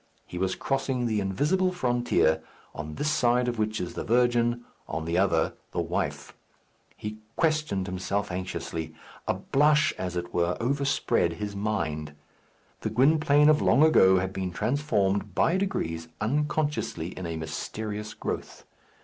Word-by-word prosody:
He 90 - -7
was 95 0 0
crossing 135 -2 -1
the 110 -3 +1
invisible 150 - +1
frontier, 120 - +2 0.3
on 75 0 -6
this 150 - 0
side 125 -3 +2
of 120 -2 -2
which 110 0 0
is 90 - -4
the - - -4
virgin, 120 0 +2 0.2
on 80 0 -3
the 85 +1 -1
other, 100 0 +2 0.2
the - - -1
wife. - - -2 0.6
He 105 0 -6 0.2
questioned 155 - +1
himself 95 +2 -2
anxiously. 85 -3 -4 0.3
A - - +1
blush, 150 +2 +3
as 90 -1 -3
it 85 0 -4
were, 85 0 +1
overspread 140 -8 +1
his 105 +3 -5
mind. 80 -8 -2 0.6
The - - -2
Gwynplaine 145 +3 +4
of 155 0 +5
long 135 +6 +5
ago 95 -12 +6
had 95 +1 -1
been 95 -1 -3
transformed, 100 - 0
by 170 - +3
degrees, 80 - -2
unconsciously 145 - -1
in 95 -1 -6
a 85 - -3
mysterious 105 +7 -5
growth. - - -5
105 Hz, 145 wpm, -27 LUFS, 90-140 Hz, 0.6 s, ago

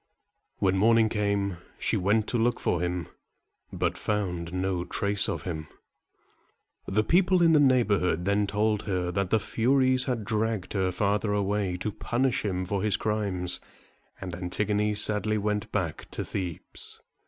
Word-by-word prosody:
When 95 0 +2
morning 115 +1 +5
came, 100 -3 0 0.2
she - - 0
went 105 +4 +2
to 120 - 0
look 120 +1 +1
for 85 - 0
him, 90 -1 -2 0.6
but - - -1
found 90 -5 -2
no 90 -1 -1
trace 100 +2 0
of - - -3
him. 80 -4 -5 1.2
The 105 +3 +1
people 180 - +3
in 165 - +6
the 155 - +6
neighborhood 105 - +3
then 100 +1 +2
told 105 +1 0
her 90 -3 -1
that 100 +1 -1
the 110 - +3
Furies 130 +4 +2
had 120 -5 -2
dragged 110 -2 -1
her 95 -2 +1
father 105 +2 0
away 100 -2 0
to 105 +4 -2
punish 120 +4 0
him 95 -3 -1
for 100 +1 -2
his 105 -1 +1
crimes, 100 -5 -1 0.6
and 95 -2 -6
Antigone 105 +4 0
sadly 105 +1 +2
went 105 0 -2
back - - -3
to - - -3
Thebes. 90 -5 -5
105 Hz, 155 wpm, -27 LUFS, 95-110 Hz, 1.2 s, in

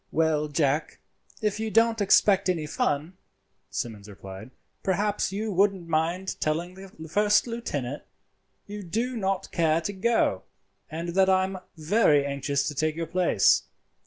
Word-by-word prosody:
"Well, 155 -2 +1
Jack, 145 0 0 0.5
if 210 0 0
you 220 0 -2
don't 225 0 +3
expect 195 -1 +4
any 165 -4 0
fun," 150 +4 -2 0.5
Simmons 105 -3 -5
replied, 95 +2 -10 0.3
"perhaps 200 +1 0
you 210 +2 -3
wouldn't 195 -2 +1
mind 165 +4 -1
telling 165 +4 -1
the 190 +1 -11 0.2
first 210 +5 +3
lieutenant 150 - -4 0.6
you 205 0 -7
do 230 +8 -2
not 195 -3 -2
care 165 -2 +2
to 200 +5 -4
go, 230 +5 +1 0.5
and 165 +2 -5
that 190 +2 +3
I 185 0 +4
am 190 0 -4 0.2
very 155 -3 +3
anxious 140 0 -1
to - - -5
take 155 +2 -1
your 165 0 -3
place. 175 - +3
180 Hz, 145 wpm, -26 LUFS, 150-205 Hz, 0.6 s, expect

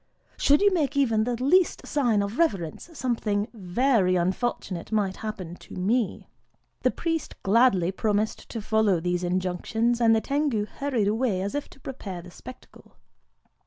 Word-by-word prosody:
Should 290 +4 +4
you 405 -1 +5
make 295 -5 0
even 225 -6 +2
the 245 0 -1
least 320 +10 +2
sign 235 -8 +1
of 200 +7 -5
reverence, 195 - 0
something 225 -8 -1
very 205 -1 +2
unfortunate 185 0 -2
might 200 -3 0
happen 195 -6 -6
to - - -12
me." 210 +4 0 0.5
The - - +3
priest 330 -2 -3
gladly 195 -4 +4
promised 210 +2 -1
to 225 -3 -5
follow 215 -4 +2
these 180 +1 -1
injunctions; 185 +7 0
and 225 -1 +5
the - - +3
Tengu 280 -7 0
hurried 250 -3 -1
away 215 -3 0
as 200 - -3
if 290 0 -3
to - - -17
prepare 200 -10 -7
the 180 - -12
spectacle. 255 - -14
220 Hz, 155 wpm, -26 LUFS, 190-255 Hz, 0.5 s, you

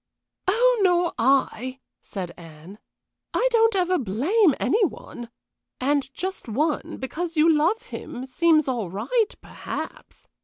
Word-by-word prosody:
"Oh, 480 +4 +3
nor 355 -2 +3
I!" 260 0 +1 0.2
said 180 -4 -6
Anne. 165 +4 -13 0.6
"I - - +3
don't 450 -2 +4
ever 365 -1 +2
blame 290 - +2
any 420 - +2
one. 240 -8 -4 0.5
And 275 0 0
just 375 -3 -5
one, 305 +6 -1
because 325 +5 -4
you 305 +2 +5
love 335 +9 +3
him, 260 - -7
seems 310 +3 +3
all 235 -8 -2
right, 440 - 0
perhaps. - - -8
305 Hz, 125 wpm, -24 LUFS, 250-375 Hz, 0.6 s, you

